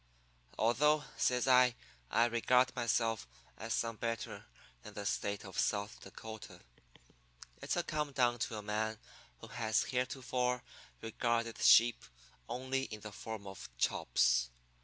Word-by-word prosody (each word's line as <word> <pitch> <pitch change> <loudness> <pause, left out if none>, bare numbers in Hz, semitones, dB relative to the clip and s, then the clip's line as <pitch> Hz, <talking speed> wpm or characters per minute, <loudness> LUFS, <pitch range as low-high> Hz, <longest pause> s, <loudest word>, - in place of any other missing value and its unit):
Although,' 150 +6 +3
says 125 0 +1
I, 125 -2 +6 0.3
'I 115 - +4
regard 125 +2 +3
myself 115 -2 0 0.3
as 110 +1 -3
some 115 -1 -2
better 115 -3 -4 0.4
than - - -11
the 100 - -5
State 100 +1 -2
of 95 - -5
South 100 0 0
Dakota, 110 -5 -10 1.0
it's - - -1
a - - +1
come 150 -1 -2
down 120 -3 +2
to 110 -1 -2
a 105 - -6
man 110 +1 -1 0.4
who - - -9
has 110 0 +1
heretofore 125 -1 -1 0.4
regarded 115 0 -1
sheep 120 0 +6 0.5
only 130 +1 -2
in 110 -4 -8
the 105 0 -8
form 110 0 -7
of 95 -1 -9
chops. - - +2
115 Hz, 135 wpm, -34 LUFS, 105-125 Hz, 1.0 s, I